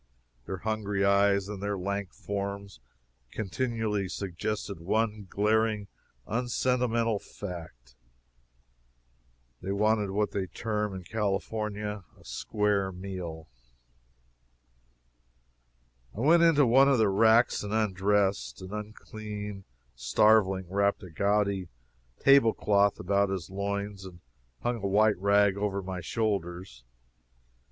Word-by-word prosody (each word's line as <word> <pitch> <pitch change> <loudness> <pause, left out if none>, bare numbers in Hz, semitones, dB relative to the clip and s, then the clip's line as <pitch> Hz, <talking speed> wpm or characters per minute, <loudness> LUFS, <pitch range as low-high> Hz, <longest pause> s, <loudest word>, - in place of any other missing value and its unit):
Their 95 - -3
hungry 105 -2 0
eyes 100 0 +3
and 100 -2 -6
their 100 0 -2
lank 100 0 -3
forms 100 -4 -5 0.5
continually 110 -2 -2
suggested 100 +1 -4
one 105 +3 -1
glaring, 105 0 +1 0.4
unsentimental 120 -1 0
fact 80 -14 -9 1.7
they 95 - -3
wanted 105 0 +2
what 105 +2 0
they 95 -2 -2
term 105 +1 -3
in 95 - -7
California 105 +1 -3 0.2
"a - - -20
square 105 -2 0
meal." 90 -4 -7 2.7
I - - -3
went 165 +5 +5
into 160 -4 +5
one 135 +4 +6
of 135 - +4
the 110 -2 +4
racks 110 +4 +4
and 105 - -5
undressed. 100 -2 +1
An 95 +1 -9
unclean 105 -1 -7 0.3
starveling 95 - +3
wrapped 100 +2 +1
a 90 - -10
gaudy 100 +1 +1 0.5
table 135 -5 +5
cloth 100 -1 +2
about 100 +2 +1
his 95 -3 -4
loins, 100 0 -3
and 90 -2 -11 0.4
hung 120 0 0
a 100 -3 -3
white 105 0 +3
rag 100 0 +3
over 100 -1 -2
my 90 -1 -5
shoulders. 90 - -3
100 Hz, 110 wpm, -29 LUFS, 95-110 Hz, 2.7 s, one